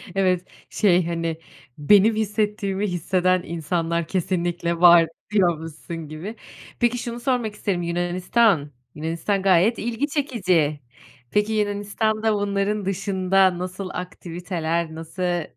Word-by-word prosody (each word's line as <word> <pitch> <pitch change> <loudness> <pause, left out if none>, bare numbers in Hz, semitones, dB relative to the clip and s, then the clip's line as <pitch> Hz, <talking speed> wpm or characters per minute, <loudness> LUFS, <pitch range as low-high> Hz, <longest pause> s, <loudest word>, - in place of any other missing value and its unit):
Evet. 185 -2 +1 0.2
Şey, 180 -4 +3
hani, 165 -1 -2 0.4
"Benim 205 +8 +5
hissettiğimi 210 -2 -1
hisseden 185 +1 +1
insanlar 170 0 -2
kesinlikle 175 -2 -1
var." 170 -1 +7 0.2
diyormuşsun 165 -3 -1
gibi. 160 +9 -7 0.4
Peki, 240 0 +2
şunu 240 -1 -5
sormak 240 -3 -1
isterim, 190 -4 -2
Yunanistan! 175 0 +1 0.2
Yunanistan 165 +6 -2
gayet 195 +4 +3
ilgi 240 +5 -2
çekici. 185 - 0 0.5
Peki, 210 +1 +1
Yunanistan'da 215 +1 0
bunların 205 0 -1
dışında 190 -1 +2
nasıl 185 +1 -5
aktiviteler, 170 -2 -4
nasıl 175 +2 -2
185 Hz, 105 wpm, -23 LUFS, 170-210 Hz, 0.5 s, var